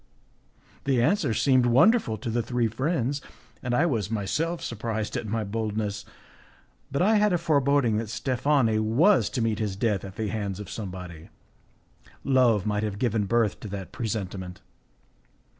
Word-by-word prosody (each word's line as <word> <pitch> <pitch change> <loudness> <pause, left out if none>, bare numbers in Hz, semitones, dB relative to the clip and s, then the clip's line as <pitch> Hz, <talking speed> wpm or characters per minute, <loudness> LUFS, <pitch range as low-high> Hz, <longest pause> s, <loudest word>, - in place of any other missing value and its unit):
The 135 -3 +2
answer 145 - +2
seemed 130 +2 +3
wonderful 130 - +4
to 115 +1 -4
the 120 +1 +1
three 120 +1 0
friends, 135 +3 -1 0.4
and 120 -1 -1
I 150 - +3
was 115 - -1
myself 150 - -1
surprised 110 -1 -3
at 110 - -3
my 110 +1 -1
boldness, 105 -1 -3 0.9
but 140 +6 +1
I 215 +3 +4
had 210 -2 +3
a - - +3
foreboding 140 -8 +2
that 110 -1 -3
Steffani 120 0 +1
was 135 - +3
to 120 - -2
meet 110 -1 0
his 105 -3 -2
death 105 -1 0
at 95 -1 -8
the 110 -2 -2
hands 100 -3 -3
of 105 - -8
somebody; 90 -5 -7 0.9
love 125 -7 +3
might 105 -1 0
have 105 -2 -3
given 110 -3 0
birth 115 0 +1
to - - -7
that 95 -2 -6
presentiment. 95 -5 -4
115 Hz, 160 wpm, -26 LUFS, 105-135 Hz, 0.9 s, wonderful